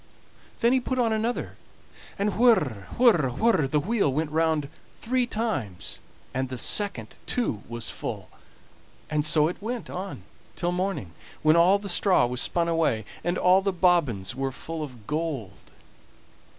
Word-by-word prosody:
Then 235 +1 +4
he 260 - +4
put 255 +1 -3
on 230 -3 +2
another, 225 +3 -2 0.6
and 200 -1 0
whir, 150 - +3
whir, 210 - +5
whir, 155 - +2
the 150 +2 +1
wheel 200 -2 +1
went 150 +2 -2
round 160 -2 +1 0.3
three 250 +1 0
times, 215 - -3 0.3
and 130 0 -2
the 130 - -5
second 120 - 0
too 175 - -1
was 120 -1 -3
full; - - -5 0.8
and 150 -1 +1
so 155 0 +4
it 175 - -6
went 235 +2 -5
on 185 - -6 0.3
till 175 0 -1
the 180 - -3
morning, 180 - -2 0.3
when 155 +1 +5
all 175 +4 +5
the 200 0 -8
straw 185 -6 +4
was 125 +1 +1
spun 170 -1 +2
away, 160 -10 +1 0.2
and 175 +2 0
all 185 +1 +4
the 195 0 0
bobbins 170 - +1
were 135 +1 -2
full 160 +4 -5
of 125 -8 -8
gold. 145 - -4
165 Hz, 160 wpm, -26 LUFS, 135-200 Hz, 0.8 s, whir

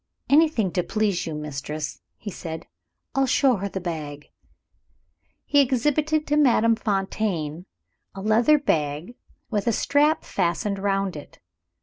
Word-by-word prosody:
"Anything 290 - +4
to 180 - +1
please 200 -1 -1
you, 160 - -4
Mistress," 150 0 -5 0.2
he 205 - -7
said. 160 -2 -7 0.5
"I'll 270 0 +2
show 260 -2 +3
her 200 +1 -3
the 190 - -4
bag." 150 -5 -6 1.1
He 285 - +3
exhibited 295 +4 +1
to 295 - +1
Madame 230 -5 +4
Fontaine 195 -6 -2 0.5
a 195 - -6
leather 230 +8 +4
bag, 155 - -1 0.4
with 205 -1 -1
a - - +4
strap 295 +7 +2
fastened 195 +2 -1
round 195 -2 0
it. 145 - -11
200 Hz, 130 wpm, -24 LUFS, 165-260 Hz, 1.1 s, Anything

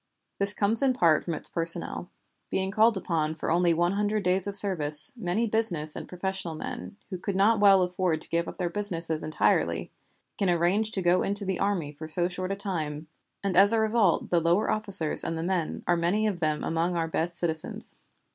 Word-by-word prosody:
This 200 0 +6
comes 215 +4 +6
in 270 -2 +2
part 165 -11 +2
from 170 - -4
its - - -6
personnel. 170 +1 0 0.4
Being 190 0 -2
called 220 +1 +3
upon 160 -4 -2
for 160 - -4
only 175 +1 +2
one 175 +2 0
hundred 205 +1 -2
days 185 +1 +1
of 200 - -4
service, 155 -7 +6
many 220 0 -2
business 190 -9 -2
and - - -8
professional 185 -2 -4
men, 200 +5 -8
who 185 - -5
could 195 +1 -4
not 210 +3 +2
well 195 -2 +5
afford 180 -2 -2
to - - -6
give 170 0 -1
up - - -8
their 180 - -2
business 175 -5 0
entirely, 155 0 -1 0.5
can 195 -3 +1
arrange 175 +5 +1
to 190 - -2
go 175 +1 +2
into 200 +1 -2
the 190 -1 -3
army 190 -7 -2
for 155 +2 -10
so 175 +3 0
short 185 +1 -5
a - - -2
time; 155 -6 -4 0.3
and 195 -2 -2
as 200 +4 +5
a 225 - +2
result 220 -4 +1
the 170 -1 +2
lower 170 +5 +1
officers 200 -7 +2
and 165 - -3
the 160 - -4
men 175 -3 -3
are 175 - +1
many 175 +6 0
of 200 -5 -2
them 155 -2 -2
among 165 +2 -2
our 165 -1 -1
best 165 +1 -3
citizens. 160 -2 -3
180 Hz, 205 wpm, -26 LUFS, 165-200 Hz, 0.5 s, This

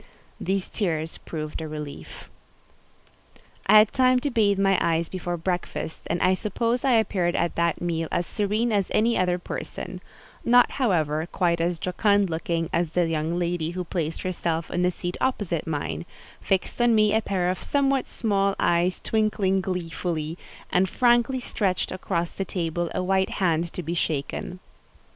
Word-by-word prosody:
These 190 +1 -1
tears 160 -5 -2
proved 155 -1 -5
a 160 - -4
relief. 145 - -8 1.4
I 215 +2 +8
had 215 0 +6
time 255 -1 +4
to 285 - -1
bathe 205 -4 +3
my 195 0 +3
eyes 165 0 +1
before 175 -1 -3
breakfast, 175 -1 -3
and 175 - -1
I 185 - +5
suppose 230 +6 -1
I 265 -2 +3
appeared 190 -6 +2
at 170 0 0
that 170 -1 0
meal 165 -2 -1
as 175 - 0
serene 215 +4 0
as 200 -3 +1
any 230 +2 +3
other 180 -1 +2
person: 180 +1 -6 0.4
not, 245 +1 +5
however, 160 - +1
quite 170 -2 +1
as 170 0 0
jocund 200 +2 +2
looking 165 0 -1
as 170 -1 0
the 175 -1 +3
young 165 +1 -1
lady 175 -2 -1
who 180 - -1
placed 165 -2 -3
herself 170 -3 -2
in 175 - 0
the 180 - +3
seat 175 0 -4
opposite 195 - -1
mine, 85 - -3 0.3
fixed 195 +5 0
on 240 -1 +5
me 215 -1 +4
a 220 - +3
pair 180 -4 0
of 185 - -5
somewhat 275 -2 +1
small 200 -3 0
eyes 175 +2 +2
twinkling 210 -3 +1
gleefully, 170 -3 -3 0.4
and 185 +1 +3
frankly 240 +3 +3
stretched 195 -6 -1
across 175 -2 -2
the 195 - -2
table 175 -2 -2
a - - 0
white 190 +1 +2
hand 170 -3 +1
to 180 - -5
be 165 +2 -3
shaken. 160 +2 -2
180 Hz, 165 wpm, -25 LUFS, 165-205 Hz, 1.4 s, I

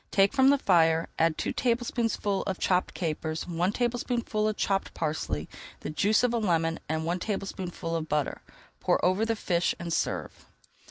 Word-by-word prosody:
Take 195 +3 +3
from 265 -1 +5
the 285 - +5
fire, 165 -7 +3
add 165 -1 +3
two - - -2
tablespoonfuls 230 -4 0
of 190 -2 -1
chopped 180 -1 +1
capers, 160 -2 -2
one 175 +2 0
tablespoonful 235 -2 -1
of 215 - -1
chopped 195 -1 -1
parsley, 80 - -2 0.3
the - - -4
juice 205 +10 +2
of 245 -1 +2
a 235 - +1
lemon, 165 -5 +1
and 160 0 -1
one 175 +2 -1
tablespoonful 185 -4 -4
of 160 -1 -3
butter. 150 -2 -1 0.4
Pour - - +2
over 185 +5 +2
the 225 - +1
fish 175 -4 0
and 170 -1 -4
serve. - - -2
185 Hz, 170 wpm, -28 LUFS, 165-215 Hz, 0.4 s, from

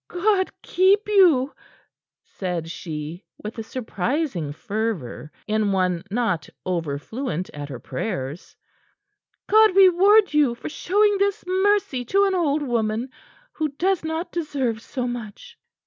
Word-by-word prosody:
"God 375 +1 +1
keep 390 +4 +3
you!" 340 -10 +4 0.7
said 175 -4 -4
she, 160 +1 -6
with 215 +2 -7
a - - -3
surprising 225 - -2
fervor 200 - -4
in 215 -1 +1
one 185 -3 0
not 210 -6 -1 0.2
over 165 -6 -1
fluent 220 - -4
at 145 0 -7
her 130 - -6
prayers. 135 - -5 0.9
"God 435 -3 +5
reward 390 +1 +6
you 290 -5 +3
for - - -7
showing 410 +5 +2
this 400 0 0
mercy 375 -8 +1
to 395 - +3
an 390 - +1
old 310 -5 +1
woman 230 -1 -1 0.4
who 310 - -1
does 370 +4 0
not 320 +2 -3
deserve 270 -9 -2
so 250 +1 -4
much." 245 - -7
250 Hz, 130 wpm, -23 LUFS, -, 0.9 s, reward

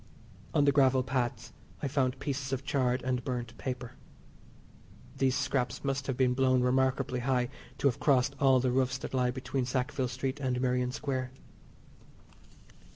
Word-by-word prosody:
On 145 - +4
the 140 - +5
gravel 135 -2 +4
paths 120 -3 -2 0.3
I - - +1
found 135 -2 0
pieces 135 -1 -3
of 135 0 -2
charred 130 -2 +1
and 125 -1 -1
burnt 120 -2 -4
paper. 125 -2 -4 1.2
These 130 -1 +2
scraps 130 -2 -1
must 135 -1 -1
have 130 -2 -2
been 125 -1 +3
blown 130 -1 +3
remarkably 130 0 +1
high 125 -1 +1 0.3
to - - +2
have 125 - 0
crossed 140 -1 +3
all 135 -2 +5
the 125 0 +1
roofs 130 0 +1
that - - -7
lie 125 -1 +2
between 130 +1 -2
Sackville 130 +1 -1
Street 130 +3 -3
and 130 -2 -1
Merrion 125 -1 +1
Square. 130 -2 -3
130 Hz, 160 wpm, -30 LUFS, 125-135 Hz, 1.2 s, the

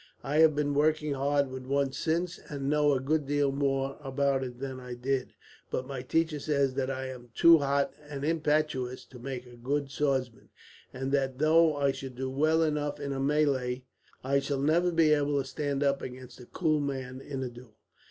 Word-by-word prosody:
I 145 +2 -1
have 160 -1 +6
been 145 -1 0
working 150 0 +2
hard 140 0 +1
with 130 0 -7
one 140 0 +1
since, 170 +5 -1
and 140 -2 -4
know 150 0 +3
a 135 - +1
good 145 +2 0
deal 145 -1 +2
more 135 -1 -1
about 135 -1 0
it 125 -2 -6
than 135 -1 -5
I 125 -1 -7
did; 130 +1 -2 0.4
but 130 - -2
my 135 -1 -5
teacher 160 +3 0
says 140 -2 +1
that 135 0 -1
I 130 0 -3
am 125 -2 -9
too 170 -1 +7
hot 140 0 +1 0.2
and 140 -1 -4
impetuous 150 -5 0
to 125 - -13
make 130 0 -5
a 120 -1 -13
good 135 +3 -2
swordsman, 135 -5 -1 0.4
and 135 +1 -4
that 135 -2 0
though 155 +1 +4
I 140 -1 +2
should 135 -1 -7
do 130 +1 -3
well 155 +4 +3
enough 150 -2 -1
in 140 -1 -3
a 135 - -3
melee, 135 -3 +1 0.4
I 140 +2 +2
shall 140 0 -2
never 165 +5 +2
be 165 -2 +4
able 145 -1 +1
to 135 - -2
stand 145 0 -2
up 140 -1 +1
against 130 0 -9
a 125 - -12
cool 155 -4 +1
man, 130 -2 -4
in 135 -1 -5
a 125 - -3
duel. 120 -2 -14
140 Hz, 200 wpm, -29 LUFS, 130-150 Hz, 0.4 s, too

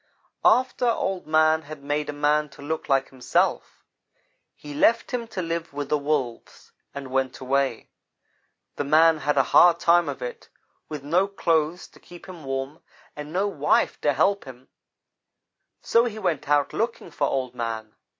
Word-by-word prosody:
"After 255 -1 +3
Old 195 -6 -1
man 155 0 +3
had 155 -2 -11
made 145 +1 -2
a - - 0
man 150 +1 +1
to - - -11
look 160 +2 -4
like 135 -1 +2
himself, 130 -2 -1 0.7
he 145 0 -10
left 230 +10 +2
him 235 -2 -3
to 190 -5 -4
live 165 -2 -4
with 145 -1 -5
the 150 - +2
Wolves, 140 -5 -3 0.2
and 135 -2 -7
went 130 -1 -1
away. 135 -2 -1 0.9
The - - -1
man 160 +2 +4
had 150 -1 -1
a 135 - +5
hard 175 -1 +7
time 170 -2 +3
of 140 - -5
it, 125 - -7 0.4
with 150 -3 -6
no 175 +7 +2
clothes 165 -3 0
to - - -20
keep 175 -1 -14
him 175 -5 -10
warm, 135 +3 -4 0.3
and 150 0 -8
no 190 +4 0
wife 150 -7 +1
to 145 - +2
help 200 +6 +1
him, 130 0 -13 1.1
so 230 +1 +3
he 220 -3 -4
went 175 -9 -2
out 145 -1 +2
looking 225 -6 -3
for 145 -1 0
Old 130 -2 -2
man. 115 -3 -5
150 Hz, 170 wpm, -24 LUFS, 140-170 Hz, 1.1 s, hard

